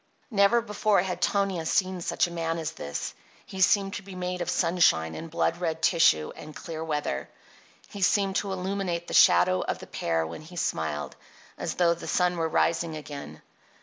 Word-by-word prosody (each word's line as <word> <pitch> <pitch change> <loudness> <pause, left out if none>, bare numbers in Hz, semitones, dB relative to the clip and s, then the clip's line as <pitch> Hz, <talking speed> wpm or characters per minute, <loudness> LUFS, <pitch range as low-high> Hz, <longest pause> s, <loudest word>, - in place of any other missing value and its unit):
Never 205 +3 +4
before 210 -3 +1
had 185 -1 -4
Tonia 195 -4 +1
seen 185 0 +1
such - - +1
a 175 - -7
man 165 -1 -2
as 160 -1 -3
this. 70 - -5 0.3
He 190 - -6
seemed 195 +1 +3
to - - -4
be 195 -1 -11
made 180 0 -3
of 175 - -2
sunshine 165 - +2
and 165 - -7
blood 165 +1 0
red 160 -2 -2
tissue 80 - +4
and 155 0 -10
clear 160 -1 -6
weather. 150 - -2 0.6
He 200 - -9
seemed 195 0 +2
to 200 - -2
illuminate 185 -2 -2
the - - -6
shadow 90 +1 +6
of - - -2
the - - -10
pear 80 -1 -1
when 80 - -7
he 165 +3 -13
smiled, 80 - -2 0.4
as - - -4
though 170 -2 +3
the 170 - -9
sun 180 -1 +1
were 165 -1 0
rising 165 0 +1
again. 145 -2 -9
170 Hz, 185 wpm, -27 LUFS, 155-190 Hz, 0.6 s, shadow